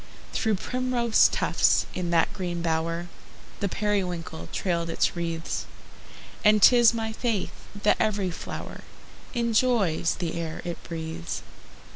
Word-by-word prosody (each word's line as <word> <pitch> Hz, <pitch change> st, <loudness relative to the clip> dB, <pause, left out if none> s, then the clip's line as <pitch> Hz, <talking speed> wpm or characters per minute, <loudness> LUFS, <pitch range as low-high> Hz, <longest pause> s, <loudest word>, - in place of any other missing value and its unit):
Through 220 Hz, -1 st, +1 dB
primrose 250 Hz, +1 st, +2 dB
tufts, -, -, +2 dB
in 180 Hz, -2 st, -2 dB
that 170 Hz, +3 st, +2 dB
green 175 Hz, -4 st, -3 dB
bower, 165 Hz, +1 st, -1 dB, 0.5 s
The 200 Hz, -, -1 dB
periwinkle 180 Hz, -, -2 dB
trailed 170 Hz, -3 st, -1 dB
its 165 Hz, -, +1 dB
wreaths; 165 Hz, -1 st, -3 dB, 0.8 s
And 210 Hz, 0 st, +6 dB
'tis 240 Hz, +2 st, +7 dB
my 225 Hz, -1 st, -3 dB
faith 225 Hz, -4 st, -1 dB, 0.3 s
that 210 Hz, -, +4 dB
every 205 Hz, -4 st, +1 dB
flower -, -, -7 dB, 0.5 s
Enjoys 230 Hz, -8 st, +2 dB
the 170 Hz, -3 st, -3 dB
air 160 Hz, -1 st, -5 dB
it 175 Hz, -1 st, -5 dB
breathes. 160 Hz, -, -5 dB
185 Hz, 120 wpm, -26 LUFS, 165-220 Hz, 0.8 s, tis